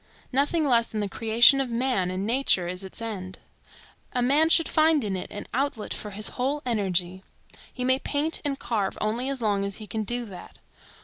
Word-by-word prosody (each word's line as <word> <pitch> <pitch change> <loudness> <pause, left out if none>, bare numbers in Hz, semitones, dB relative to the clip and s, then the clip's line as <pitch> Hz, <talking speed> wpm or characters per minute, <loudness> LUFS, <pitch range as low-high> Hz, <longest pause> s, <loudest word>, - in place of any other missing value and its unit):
Nothing 290 +4 +2
less 235 -3 +3
than 215 - -4
the 205 - -1
creation 230 +6 +5
of 265 - -2
man 235 -6 0
and 185 +2 -3
nature 230 -6 +2
is 180 +2 -2
its 190 +4 -6
end. 190 -5 -6 0.8
A 250 - 0
man 295 +6 +3
should 330 0 +5
find 310 -3 +3
in 200 -3 -2
it 185 - -5
an 205 - -7
outlet 270 -3 -2
for 210 - -6
his 205 0 -3
whole 280 +4 -2
energy. 190 -5 -1 0.5
He 250 - -4
may 260 +1 +2
paint 295 +3 -1
and 285 -2 -1
carve 225 -6 -2
only 230 +5 -1
as 270 -3 -3
long 200 -2 +1
as 200 0 -3
he 215 - -8
can 220 +1 -3
do 240 +3 -2
that. 185 -5 -11
230 Hz, 200 wpm, -26 LUFS, 200-270 Hz, 0.8 s, creation